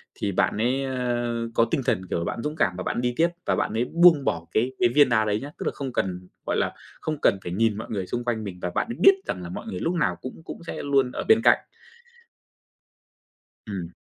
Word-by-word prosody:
thì 100 - -2
bạn 100 - +1
ấy, 125 +5 +1
ơ, 120 -2 -1 0.2
có 115 - +4
tinh 160 - +1
thần, 95 -5 +1
kiểu - - 0
là, 85 - -3
bạn - - -3
dũng 150 +1 -3
cảm 90 - +1
và 90 - -3
bạn 120 - -1
đi 125 0 0
tiếp 170 +1 +4 0.2
và - - +2
bạn - - -1
ấy 115 +2 +1
buông 165 -3 +5
bỏ 85 - -1
cái 120 +4 +1
cái 120 - +4
viên 145 +2 +5
đá 110 -2 +3
đấy 105 0 0
nhá, 145 +2 -7
tức - - -5
là - - +1
không 135 -3 -5
cần, 90 -1 -2 0.2
gọi - - 0
là, - - 0 0.3
không 155 -1 -2
cần 100 - +4
phải 90 - -5
nhìn 110 +2 +1
mọi 110 - -6
người 95 -4 -3
xung 120 - -3
quanh 110 -3 -1
mình 95 -3 -7
và 90 - -1
bạn - - +1
ấy 235 - -5
biết 390 - +8
rằng 90 - -3
là 85 - -6
mọi 90 - -6
người 90 - -4
lúc 170 - 0
nào 165 - +1
cũng 130 +5 -8
cũng - - -9
sẽ - - -5
luôn 135 -3 +2
ở - - -4
bên 220 +1 +6
cạnh. - - +6 2.1
Ừm. 90 -4 -4
120 Hz, 255 wpm, -25 LUFS, 100-140 Hz, 2.1 s, biết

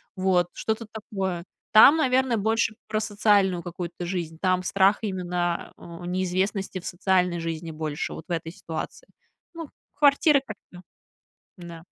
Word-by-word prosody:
Вот 185 -2 +2
что-то 220 +1 -3
такое. 190 -5 -4 0.3
Там, 275 +9 +8
наверное, 260 -4 +2
больше 220 +1 +1
про 215 0 -1
социальную 205 -4 +2
какую-то 175 0 -6
жизнь. 170 -3 -4
Там 185 -1 +1
страх 195 +2 +3
именно, 180 -4 -2
а, 170 -1 -11
у - - -7
неизвестности 185 +2 -1
в - - -14
социальной 180 -1 +1
жизни 165 0 -4
больше 155 -1 -4
вот - - -9
в - - -9
этой 165 -1 -3
ситуации. 165 - -7 0.5
Ну, 330 -3 -7 0.3
квартиры 285 0 +4
как - - -8
всё. 180 0 -12 0.8
М-да. 170 -1 -10
185 Hz, 145 wpm, -25 LUFS, 175-215 Hz, 0.8 s, Там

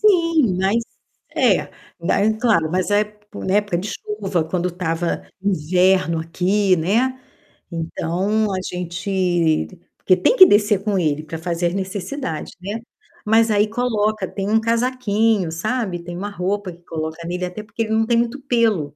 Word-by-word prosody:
Sim. 335 - +3
Mas 195 +4 +2 0.6
é, - - +3 0.3
daí 200 +5 +2
claro, 205 -10 +2
mas 185 +2 0
a 205 - +4
ép 210 0 -2 0.2
na 190 - -2
época 205 -4 +1
de 200 - -4
chuva 195 -5 -2
quando 175 +2 -1
estava 170 -1 -2 0.2
inverno 185 -1 +2
aqui, 185 +4 +1
né. 240 +10 +1 0.5
Então 175 +6 -1
a - - -1 0.2
gente 175 -2 0 0.3
porque 185 -1 +3
tem 330 - +3
que 375 - +11
descer 205 - +3
com 205 -2 +1
ele 155 -2 0
para 160 +1 -6
fazer 170 +1 -1
as 170 - -2
necessidade, 195 - -4
né. 205 +4 -4 0.5
Mas 225 +1 +4
aí 210 +1 +3
coloca 215 -3 0
tem 195 0 -4
um 220 +1 +4
casaquinho, 225 -5 +1
sabe, 205 +1 -2
tem 175 0 -7
uma 205 +3 -4
roupa 200 0 -2
que 175 +1 -17
coloca 160 0 -5
nele, 180 +1 -2
até 180 +4 -6
porque 225 +1 -3
ele 220 - -5
não 225 0 +3
tem 235 +1 +2
muito 235 +3 0
pelo, 220 - +1
195 Hz, 160 wpm, -21 LUFS, 175-220 Hz, 0.6 s, que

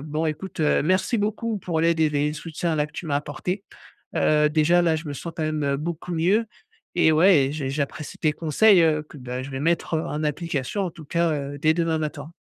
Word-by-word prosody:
bon 155 +2 -2
écoute, 160 +5 -5
heu, 150 - +3
merci 185 - +1
beaucoup 215 +1 -1
pour 170 -3 -2
l'aide 165 0 +2
et 155 -1 +3
les 150 0 0
soutiens-là 155 -1 -2
que - - -24
tu 165 - -7
m'as 145 - -1
apportés. 150 +7 -4 0.5
Heu, 150 0 +3
déjà, 160 +3 +3
là, 165 -2 +2
je 160 +1 -7
me 145 - -3
sens 165 +4 -6
quand 160 - -1
même 150 -3 0
beaucoup 170 +3 -5
mieux 190 +8 +2 0.5
et 160 -2 +5
ouais 175 +3 +6
et - - -4
j'ai 140 -3 -3
j'apprécie 140 +1 -4
tes 155 - +2
conseils, 170 +5 +4
heu, 155 -2 +2
que, 155 - -14
bah, 125 0 -5
je 140 - -8
vais 135 0 -4
mettre, 170 +1 0
heu, 160 - 0
en 150 +1 -3
application, 150 +2 -2
en 185 - -2
tout 165 -1 -12
cas, 170 +2 +1
heu, 145 -1 -4
dès 155 0 +4
demain 165 -2 0
matin. 150 0 -5
155 Hz, 225 wpm, -24 LUFS, 150-170 Hz, 0.5 s, ouais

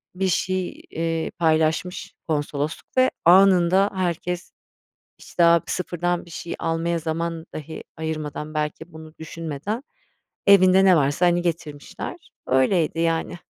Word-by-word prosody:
bir 190 +1 0
şey, 185 0 -1
eee, 165 0 -2
paylaşmış 160 +3 0
konsolosluk 150 - -3
ve 255 0 +5
anında 190 +1 +5
herkes, 180 -1 -3 0.7
işte, 175 - -1
a 170 0 +6
bir - - -3
sıfırdan 175 -1 -2
bir - - -16
şey 170 - -6
almaya 165 +1 -1
zaman 165 +1 -3
dahi 155 +1 -7
ayırmadan, 155 -1 -4
belki 155 +2 -4
bunu 160 0 -11
düşünmeden 165 - -5 0.6
evinde 190 -1 +6
ne 185 -2 +6
varsa, 145 +4 +2
hani, 175 0 +3
getirmişler. 160 -4 -5 0.3
Öyleydi, 155 +5 +2
yani. 165 +1 0
165 Hz, 125 wpm, -23 LUFS, 160-180 Hz, 0.7 s, a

